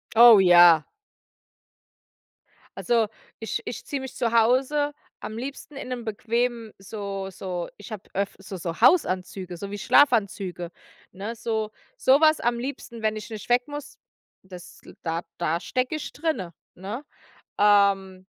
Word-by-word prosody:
Oh, 230 Hz, -2 st, +9 dB
ja. 175 Hz, -4 st, +7 dB, 1.9 s
Also, 230 Hz, -2 st, +2 dB, 0.3 s
ich 225 Hz, +1 st, -3 dB
ich 235 Hz, -, -6 dB
ziehe 280 Hz, -2 st, -4 dB
mich 265 Hz, -1 st, -8 dB
zu 230 Hz, -, 0 dB
Hause 260 Hz, +6 st, +2 dB, 0.3 s
am 220 Hz, -, -7 dB
liebsten 275 Hz, +4 st, -7 dB
in 275 Hz, -, -7 dB
'nem 245 Hz, -2 st, -5 dB
bequemen 230 Hz, +1 st, -2 dB
so 195 Hz, -1 st, -6 dB
so 180 Hz, -2 st, -5 dB
ich 205 Hz, +3 st, -12 dB
habe 210 Hz, -3 st, -8 dB
öft 200 Hz, 0 st, -3 dB
so 195 Hz, 0 st, -8 dB
so 170 Hz, -1 st, -5 dB
Hausanzüge, 185 Hz, -, +2 dB
so 200 Hz, +3 st, -7 dB
wie 205 Hz, -, -4 dB
Schlafanzüge, 200 Hz, -8 st, +2 dB, 0.4 s
ne, 205 Hz, +5 st, -6 dB
so 220 Hz, -2 st, -2 dB, 0.3 s
sowas 310 Hz, -, +4 dB
am 240 Hz, 0 st, 0 dB
liebsten, 245 Hz, -3 st, -6 dB
wenn 215 Hz, 0 st, 0 dB
ich 215 Hz, -, -8 dB
nicht 220 Hz, 0 st, -8 dB
weg 245 Hz, +2 st, +3 dB
muss, 290 Hz, 0 st, -8 dB, 0.5 s
das 180 Hz, -2 st, -12 dB, 0.2 s
da 165 Hz, 0 st, -2 dB, 0.2 s
da 170 Hz, -1 st, 0 dB
stecke 255 Hz, -, -2 dB
ich 305 Hz, -, -5 dB
drinne, 255 Hz, -, -3 dB, 0.2 s
ne? 205 Hz, +9 st, -6 dB, 0.6 s
Ähm, 195 Hz, -2 st, +3 dB
220 Hz, 140 wpm, -25 LUFS, 190-245 Hz, 1.9 s, Oh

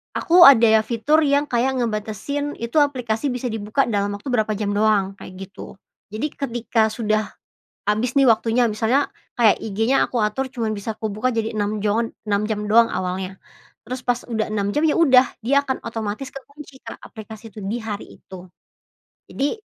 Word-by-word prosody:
aku 345 Hz, +1 st, +6 dB
ada 225 Hz, -5 st, +6 dB
fitur 255 Hz, +8 st, +2 dB
yang 285 Hz, +1 st, +2 dB
kayak 255 Hz, +2 st, 0 dB
ngebatasin 235 Hz, +6 st, -3 dB
itu 235 Hz, +5 st, -3 dB
aplikasi 255 Hz, -4 st, 0 dB
bisa 250 Hz, 0 st, -3 dB
dibuka 220 Hz, +5 st, 0 dB
dalam 205 Hz, -2 st, -1 dB
waktu 205 Hz, -, -11 dB
berapa 220 Hz, -2 st, +1 dB
jam 205 Hz, -1 st, -2 dB
doang, 205 Hz, -2 st, +2 dB
kayak 185 Hz, -, -10 dB, 0.2 s
gitu. -, -, -11 dB, 0.4 s
Jadi 220 Hz, +8 st, -2 dB
ketika 235 Hz, -4 st, 0 dB
sudah 215 Hz, -1 st, -1 dB, 0.6 s
habis 220 Hz, +4 st, 0 dB
nih 275 Hz, -, +5 dB
waktunya, 230 Hz, +2 st, +3 dB
misalnya 225 Hz, +6 st, +1 dB, 0.3 s
kayak 225 Hz, -4 st, +5 dB
IG-nya 225 Hz, +5 st, +1 dB
aku 245 Hz, -, -3 dB
atur 260 Hz, +6 st, -1 dB
cuman 225 Hz, -4 st, -2 dB
bisa 210 Hz, +2 st, -5 dB
kubuka 220 Hz, +3 st, -2 dB
jadi 225 Hz, 0 st, -2 dB
6 210 Hz, 0 st, -1 dB
joan 225 Hz, +2 st, 0 dB, 0.2 s
6 200 Hz, -1 st, +1 dB
jam 210 Hz, -1 st, -2 dB
doang 230 Hz, +2 st, +5 dB
awalnya. 185 Hz, +1 st, -4 dB, 0.5 s
Terus 255 Hz, 0 st, -5 dB
pas 245 Hz, -1 st, 0 dB
udah 220 Hz, -2 st, -2 dB
6 200 Hz, -2 st, -1 dB
jam, 295 Hz, -, +1 dB
ya 295 Hz, -, +2 dB
udah, 265 Hz, -5 st, +6 dB, 0.2 s
dia 280 Hz, +4 st, +3 dB
akan 265 Hz, -1 st, -3 dB
otomatis 225 Hz, +3 st, -4 dB
kekunci, 280 Hz, 0 st, -12 dB
Kak, -, -, -8 dB
aplikasi 220 Hz, 0 st, -11 dB
itu 215 Hz, -, -9 dB
di 205 Hz, +5 st, -2 dB
hari 215 Hz, -2 st, -7 dB
itu. 185 Hz, -1 st, -11 dB, 0.9 s
Jadi, 280 Hz, +2 st, -1 dB
225 Hz, 170 wpm, -21 LUFS, 210-260 Hz, 0.9 s, aku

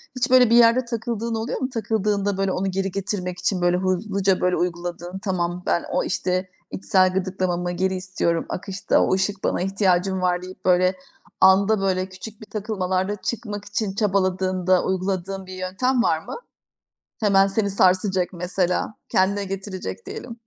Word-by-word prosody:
Hiç 255 Hz, +1 st, 0 dB
böyle 255 Hz, -2 st, +7 dB
bir 230 Hz, -, +5 dB
yerde 235 Hz, +1 st, +5 dB
takıldığın 230 Hz, -1 st, -3 dB
oluyor 225 Hz, +3 st, -3 dB
mu? 260 Hz, -, -1 dB
Takıldığında 210 Hz, -4 st, -1 dB
böyle 195 Hz, -1 st, 0 dB
onu 190 Hz, +1 st, -1 dB
geri 195 Hz, +1 st, -1 dB
getirmek 185 Hz, -2 st, -3 dB
için 185 Hz, -3 st, 0 dB
böyle 175 Hz, 0 st, +3 dB
hızlıca, 190 Hz, +1 st, 0 dB
böyle, 180 Hz, 0 st, +2 dB
uyguladığın, 175 Hz, +1 st, -3 dB
tamam 180 Hz, -2 st, -2 dB
ben 170 Hz, -, +1 dB
o, -, -, +1 dB
işte, 185 Hz, 0 st, -1 dB, 0.2 s
içsel 185 Hz, -1 st, +2 dB
gıdıklamamı 185 Hz, -2 st, -1 dB
geri 190 Hz, +2 st, 0 dB
istiyorum 185 Hz, -2 st, -1 dB
akışta, 195 Hz, +1 st, 0 dB
o -, -, +2 dB
ışık 195 Hz, +1 st, -1 dB
bana -, -, 0 dB
ihtiyacım 190 Hz, -1 st, +1 dB
var 180 Hz, -1 st, +1 dB
deyip, 185 Hz, +1 st, -11 dB
böyle, 185 Hz, 0 st, +4 dB, 0.5 s
anda, 195 Hz, +2 st, +5 dB
böyle, 185 Hz, -1 st, 0 dB
küçük 200 Hz, +3 st, -10 dB
bir -, -, -9 dB
takılmalarda 195 Hz, -2 st, -2 dB
çıkmak 210 Hz, -3 st, -4 dB
için 205 Hz, -1 st, -2 dB
çabaladığında 185 Hz, -3 st, +1 dB
uyguladığın 190 Hz, 0 st, -2 dB
bir 185 Hz, -, -9 dB
yöntem 235 Hz, +8 st, 0 dB
var 160 Hz, -, +2 dB
mı? -, -, -8 dB, 0.8 s
Hemen 195 Hz, -2 st, +4 dB
seni 200 Hz, +1 st, 0 dB
sarsacak 185 Hz, -1 st, +2 dB
mesela, 180 Hz, +2 st, -1 dB, 0.2 s
kendine 200 Hz, +2 st, +2 dB
getirecek 190 Hz, -, -6 dB
diyelim. -, -, -7 dB
190 Hz, 155 wpm, -23 LUFS, 185-205 Hz, 0.8 s, böyle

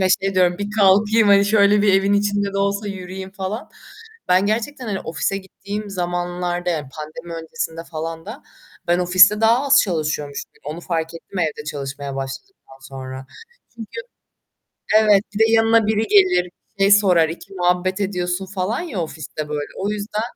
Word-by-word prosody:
ve 185 Hz, -, +3 dB
şey 195 Hz, 0 st, -2 dB
diyorum 180 Hz, 0 st, +3 dB
"Bir 205 Hz, -, -3 dB
kalkayım 205 Hz, +3 st, +4 dB
hani 200 Hz, 0 st, +6 dB
şöyle 205 Hz, 0 st, +4 dB
bir 205 Hz, -1 st, +4 dB
evin 195 Hz, +1 st, +3 dB
içinde 205 Hz, -1 st, +1 dB
de 195 Hz, -, -2 dB
olsa 200 Hz, +1 st, 0 dB
yürüyeyim." 190 Hz, 0 st, -7 dB
falan. 195 Hz, +3 st, -5 dB, 0.6 s
Ben 185 Hz, +2 st, +4 dB
gerçekten 235 Hz, +6 st, -2 dB
hani 200 Hz, -3 st, -2 dB
ofise 170 Hz, +4 st, -2 dB
gittiğim 200 Hz, +2 st, -7 dB
zamanlarda 175 Hz, -1 st, -2 dB
yani 150 Hz, -5 st, -3 dB
pandemi 155 Hz, +3 st, -8 dB
öncesinde 165 Hz, -3 st, -5 dB
falan 165 Hz, +1 st, -5 dB
da, 225 Hz, +8 st, -9 dB, 0.4 s
ben 175 Hz, +1 st, +2 dB
ofiste 185 Hz, +4 st, +5 dB
daha 235 Hz, +5 st, +4 dB
az 275 Hz, -, +5 dB
çalışıyormuşum. 155 Hz, -5 st, -3 dB
Onu 155 Hz, +4 st, -6 dB
fark 165 Hz, -2 st, -3 dB
ettim, 175 Hz, +3 st, -7 dB
evde 155 Hz, -3 st, -2 dB
çalışmaya 140 Hz, -2 st, -5 dB
başladıktan 135 Hz, -, -8 dB
sonra. 130 Hz, 0 st, -8 dB, 0.5 s
Çünkü 230 Hz, -, -8 dB, 1.0 s
evet, 210 Hz, -2 st, +5 dB
bir 205 Hz, -, -4 dB
de 225 Hz, 0 st, +4 dB
yanına 225 Hz, -1 st, +4 dB
biri 215 Hz, 0 st, +1 dB
gelir, 185 Hz, -3 st, +4 dB, 0.3 s
şey 195 Hz, +1 st, +4 dB
sorar, 185 Hz, -6 st, +5 dB
iki 170 Hz, +4 st, -9 dB
muhabbet 180 Hz, +1 st, 0 dB
ediyorsun 180 Hz, -1 st, -2 dB
falan 190 Hz, -, -2 dB
ya 290 Hz, -, -5 dB
ofiste 155 Hz, -1 st, -6 dB
böyle. 150 Hz, -1 st, -3 dB
O 200 Hz, -, -2 dB
yüzden, 210 Hz, +1 st, -3 dB
190 Hz, 160 wpm, -20 LUFS, 165-205 Hz, 1.0 s, hani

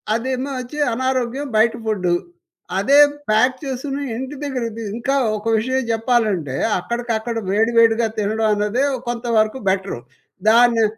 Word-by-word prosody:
అదేమో 260 Hz, +3 st, -2 dB
వచ్చి 255 Hz, +4 st, -7 dB
అనారోగ్యం, 260 Hz, +2 st, -1 dB
బయట 225 Hz, +1 st, +4 dB
ఫుడ్డు. 190 Hz, -5 st, 0 dB, 0.7 s
అదే 275 Hz, +8 st, +4 dB, 0.3 s
ప్యాక్ 250 Hz, +5 st, +3 dB
చేసుకుని, 275 Hz, +1 st, -4 dB
ఇంటి 265 Hz, +3 st, -5 dB
దగ్గరకి 250 Hz, -5 st, -3 dB
తీ 230 Hz, -, -5 dB
ఇంకా 265 Hz, +4 st, -1 dB, 0.2 s
ఒక 210 Hz, -, -11 dB
విషయం 260 Hz, +4 st, 0 dB
జెప్పాలంటే 220 Hz, -, 0 dB, 0.2 s
అక్కడికక్కడ 235 Hz, +2 st, -3 dB
వేడివేడిగా 225 Hz, +2 st, +3 dB
తినడం 220 Hz, +1 st, 0 dB
అన్నదే 210 Hz, +5 st, 0 dB, 0.2 s
కొంతవరకు 235 Hz, -1 st, 0 dB
బెటరూ. 190 Hz, -6 st, -1 dB, 0.5 s
దాన్ని, 235 Hz, 0 st, +5 dB
235 Hz, 120 wpm, -20 LUFS, 220-255 Hz, 0.7 s, దాన్ని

